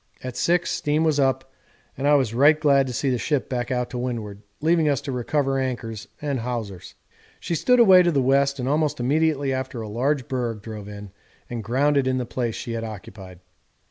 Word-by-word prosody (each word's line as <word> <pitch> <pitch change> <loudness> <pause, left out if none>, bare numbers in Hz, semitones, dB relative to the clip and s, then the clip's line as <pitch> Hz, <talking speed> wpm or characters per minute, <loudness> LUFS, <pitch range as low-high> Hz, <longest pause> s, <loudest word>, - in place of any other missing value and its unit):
At 130 -1 -6
6 175 +7 +1
steam 150 +2 0
was 155 -2 +2
up, 135 -1 0 0.4
and 140 - -2
I 145 - +6
was 130 -6 +1
right 145 +5 +5
glad 140 -3 +3
to - - -4
see 135 +3 0
the 125 - 0
ship 145 +1 -1
back 120 -2 -3
out 125 -1 -2
to 125 - -4
windward, 110 -5 -4 0.2
leaving 160 0 +2
us 140 - +1
to 140 -1 -5
recover 135 +2 0
anchors 115 -4 -4
and 140 -3 -2
hawsers. 115 -6 -5 0.4
She - - -4
stood 250 - +3
away 190 -6 +8
to 175 -1 +2
the 140 - +1
west, 140 +1 +2
and 125 -1 -3
almost 150 0 0
immediately 140 +1 +1
after 130 -2 -4
a 110 - -5
large 125 +4 -1
berg 120 -5 -3
drove 105 -2 -8
in 105 -1 -9 0.4
and 115 -2 -4
grounded 135 +4 +1
in 130 0 +1
the 125 - -2
place 120 -2 -3
she 120 - -6
had 115 -1 -3
occupied. 95 -4 -9
130 Hz, 205 wpm, -23 LUFS, 115-145 Hz, 0.4 s, away